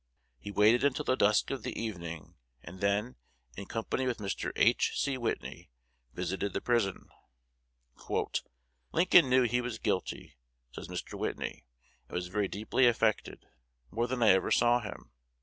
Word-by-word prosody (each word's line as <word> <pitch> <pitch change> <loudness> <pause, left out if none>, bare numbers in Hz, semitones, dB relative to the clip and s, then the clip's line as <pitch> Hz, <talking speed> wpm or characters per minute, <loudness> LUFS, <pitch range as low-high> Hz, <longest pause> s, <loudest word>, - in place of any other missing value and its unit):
He 105 - -8
waited 105 +5 +4
until 140 -2 +1
the 130 - +2
dusk 105 -3 +3
of 135 - -3
the - - -5
evening, 85 -8 -6 0.3
and 90 +4 -10
then, 100 +5 0 0.4
in 100 - -7
company 115 +3 -2
with 125 - -1
Mr. 100 -2 -3
H. - - +3
C. 140 -1 0
Whitney, 120 -3 -4 0.5
visited 95 +3 -2
the - - -1
prison. 115 -6 0 1.8
"Lincoln 175 -5 +5
knew 130 0 +5
he 125 +1 +1
was 120 -2 -4
guilty," 90 - -3 0.3
says - - -8
Mr. - - -6
Whitney, - - -4 0.4
"and - - -8
was 90 0 -3
very 105 +1 0
deeply 110 +6 +1
affected, 115 -2 0 0.5
more 115 +4 0
than 125 -1 -1
I 110 - +6
ever 95 0 +4
saw 120 0 +4
him. 105 -4 -9
110 Hz, 150 wpm, -31 LUFS, 100-125 Hz, 1.8 s, I